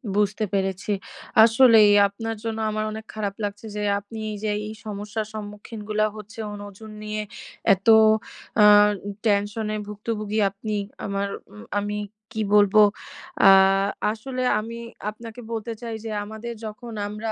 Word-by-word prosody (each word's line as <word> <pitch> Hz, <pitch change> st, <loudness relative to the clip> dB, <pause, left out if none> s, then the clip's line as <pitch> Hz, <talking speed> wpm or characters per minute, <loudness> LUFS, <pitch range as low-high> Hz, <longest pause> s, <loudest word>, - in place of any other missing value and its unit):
বুঝতে 210 Hz, +1 st, +1 dB
পেরেছি। 195 Hz, +1 st, -1 dB, 0.5 s
আসলেই, 225 Hz, -2 st, +7 dB, 0.2 s
আপনার 225 Hz, +3 st, -5 dB
জন্য 225 Hz, -1 st, -3 dB
আমার 215 Hz, 0 st, -1 dB
অনেক 220 Hz, 0 st, -7 dB
খারাপ 205 Hz, -2 st, -3 dB
লাগছে 205 Hz, +1 st, -4 dB
যে, 210 Hz, -, -3 dB, 0.2 s
আপনি 210 Hz, +2 st, -10 dB
এই 210 Hz, -, -5 dB
যে 215 Hz, -, 0 dB, 0.2 s
এই 215 Hz, -, -6 dB
সমস্যার 210 Hz, +1 st, -4 dB
সম্মুখীনগুলা 215 Hz, 0 st, -3 dB
হচ্ছে 215 Hz, +1 st, -11 dB
ওজন 205 Hz, +1 st, -9 dB
নিয়ে, 215 Hz, 0 st, -3 dB, 0.5 s
এত 195 Hz, +2 st, -5 dB, 0.8 s
আ -, -, +9 dB, 0.4 s
উ -, -, -3 dB, 0.2 s
টেনশন 205 Hz, +1 st, 0 dB
এ -, -, -2 dB
ভুক্তভুগি 210 Hz, 0 st, -3 dB
আপনি, 210 Hz, +2 st, -5 dB, 0.3 s
আমার, 200 Hz, 0 st, -1 dB, 0.5 s
আমি 205 Hz, +1 st, -3 dB, 0.3 s
কি 220 Hz, -1 st, -3 dB
বলবো? 205 Hz, +1 st, +6 dB, 0.7 s
আ -, -, +10 dB, 0.6 s
আসলে 255 Hz, +4 st, -4 dB, 0.2 s
আমি 230 Hz, +2 st, -6 dB, 0.3 s
আপনাকে 225 Hz, +2 st, -10 dB
বলতে 230 Hz, 0 st, -3 dB
চাই 230 Hz, -2 st, -5 dB
যে, 220 Hz, -, -4 dB
আমাদের 220 Hz, +3 st, -7 dB
যখন 225 Hz, +2 st, -8 dB, 0.2 s
আমরা 215 Hz, +2 st, -4 dB
215 Hz, 140 wpm, -24 LUFS, 205-225 Hz, 0.8 s, আ